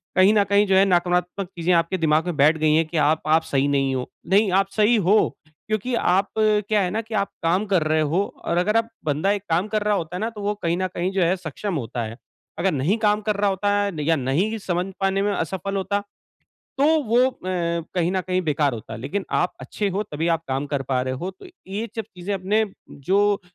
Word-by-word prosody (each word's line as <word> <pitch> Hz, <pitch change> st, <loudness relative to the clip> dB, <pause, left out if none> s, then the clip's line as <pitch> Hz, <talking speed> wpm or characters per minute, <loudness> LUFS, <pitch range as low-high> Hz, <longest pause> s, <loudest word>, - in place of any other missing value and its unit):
कहीं 190 Hz, +3 st, +6 dB
न 205 Hz, -, +4 dB
कहीं 200 Hz, +1 st, +3 dB
जो 190 Hz, -, +3 dB
है 195 Hz, +1 st, +6 dB
नकारात्मक 180 Hz, +1 st, 0 dB
चीज़ें 175 Hz, +1 st, +1 dB
आपके 170 Hz, +2 st, +2 dB
दिमाग 155 Hz, 0 st, +2 dB
में 175 Hz, -3 st, -2 dB
बैठ 155 Hz, +3 st, +5 dB
गई 155 Hz, 0 st, +2 dB
हैं 160 Hz, 0 st, +3 dB
कि 165 Hz, -, -4 dB
आप 155 Hz, +1 st, +3 dB
आप 160 Hz, +1 st, +4 dB
सही 140 Hz, -2 st, 0 dB
नहीं 135 Hz, -1 st, +1 dB
हो। 125 Hz, -, -4 dB, 0.2 s
नहीं 195 Hz, +2 st, +3 dB
आप 195 Hz, +1 st, +3 dB
सही 215 Hz, +2 st, +4 dB
हो, 205 Hz, +1 st, +2 dB
क्योंकि 215 Hz, -, -4 dB
आप 195 Hz, -1 st, +2 dB
क्या 210 Hz, -1 st, +2 dB
है 185 Hz, -, 0 dB
ना 220 Hz, +3 st, -1 dB
कि 225 Hz, 0 st, -11 dB
आप 200 Hz, -1 st, 0 dB
काम 180 Hz, +5 st, +2 dB
कर 190 Hz, -6 st, +2 dB
रहे 155 Hz, 0 st, +2 dB
हो, 160 Hz, +6 st, +1 dB, 0.2 s
और 170 Hz, -, 0 dB
अगर 210 Hz, +5 st, +2 dB
आप 230 Hz, 0 st, 0 dB, 0.2 s
बंदा 155 Hz, +6 st, +1 dB
एक 205 Hz, -2 st, -2 dB
काम 175 Hz, +5 st, +1 dB
कर 215 Hz, 0 st, -1 dB
रहा 210 Hz, -1 st, +2 dB
होता 170 Hz, -1 st, -4 dB
है -, -, -3 dB
ना, 225 Hz, -, 0 dB
तो 220 Hz, -3 st, -9 dB
वो 205 Hz, +1 st, 0 dB
कहीं 170 Hz, 0 st, +1 dB
न 185 Hz, 0 st, 0 dB
कहीं 180 Hz, +2 st, -1 dB
जो 195 Hz, -1 st, 0 dB
है 175 Hz, +3 st, +2 dB
सक्षम 180 Hz, +2 st, -5 dB
होता 120 Hz, -3 st, -3 dB
है। 110 Hz, +1 st, -7 dB, 0.4 s
अगर 190 Hz, +2 st, +2 dB
नहीं 155 Hz, -, +1 dB
काम 210 Hz, 0 st, +3 dB
कर 210 Hz, -, +2 dB
रहा 200 Hz, 0 st, +1 dB
होता 205 Hz, +2 st, 0 dB
है 190 Hz, -7 st, -2 dB
या 165 Hz, +2 st, +3 dB
नहीं 160 Hz, -, 0 dB
समझ 180 Hz, -3 st, -2 dB
पाने 195 Hz, 0 st, +1 dB
में 205 Hz, -, +1 dB
असफल 190 Hz, +4 st, -3 dB
होता 200 Hz, +1 st, -1 dB, 0.8 s
तो 280 Hz, -, +3 dB, 0.2 s
वो 230 Hz, 0 st, +1 dB
अ, 260 Hz, -, -1 dB, 0.6 s
कहीं 175 Hz, -1 st, +1 dB
न 190 Hz, -, +1 dB
कहीं 185 Hz, 0 st, -1 dB
बेकार 150 Hz, -4 st, +1 dB
होता। 110 Hz, 0 st, -8 dB
लेकिन 145 Hz, -, -4 dB
आप 180 Hz, -, 0 dB
अच्छे 205 Hz, -, -3 dB
हो 200 Hz, -, 0 dB
तभी 160 Hz, -3 st, -3 dB
आप 165 Hz, -, -5 dB
काम 135 Hz, +2 st, -1 dB
कर 140 Hz, -2 st, -2 dB
पा 130 Hz, -1 st, -1 dB
रहे 130 Hz, 0 st, -2 dB
हो 175 Hz, +8 st, -4 dB
तो 190 Hz, -, -15 dB, 0.2 s
ये 210 Hz, +4 st, -3 dB
सब 225 Hz, -, -1 dB
चीज़ें 180 Hz, +3 st, -5 dB
अपने 205 Hz, +4 st, +1 dB, 0.3 s
जो 200 Hz, +7 st, +1 dB
185 Hz, 240 wpm, -23 LUFS, 160-205 Hz, 0.8 s, कहीं